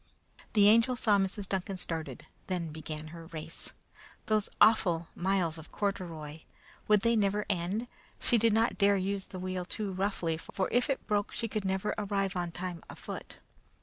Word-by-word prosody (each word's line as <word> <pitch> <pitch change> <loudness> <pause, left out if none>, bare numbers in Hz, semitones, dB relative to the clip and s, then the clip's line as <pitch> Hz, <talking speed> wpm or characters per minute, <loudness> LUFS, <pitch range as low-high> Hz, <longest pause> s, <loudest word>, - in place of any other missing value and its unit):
The 205 -2 +6
Angel 230 +4 +5
saw 210 -4 +3
Mrs. 195 +1 -1
Duncan 190 0 -2
started; 165 -3 -4 0.2
then 175 -4 -2
began 155 0 -6
her 165 0 -10
race. 160 -1 -7 0.5
Those 215 -1 +1
awful 175 -7 +5
miles 175 -3 0
of 160 - -12
corduroy! 165 -7 -3 0.5
Would 210 -1 +5
they 230 +2 +3
never 205 -1 +2
end? 195 +6 -1 0.3
She 240 - +3
did 225 +1 +4
not 225 +1 +2
dare 200 0 +5
use 195 +1 -2
the 185 - -8
wheel 185 0 -3
too 195 +2 -4
roughly, 185 -4 0
for 190 +3 -2
if 245 +5 +2
it 275 - -1
broke 205 -1 0
she 230 - -2 0.2
never 190 +1 0
could - - -3
arrive 195 -2 +1
on 175 -1 -1
time 175 -1 -4
afoot. - - -7
190 Hz, 170 wpm, -31 LUFS, 170-210 Hz, 0.5 s, The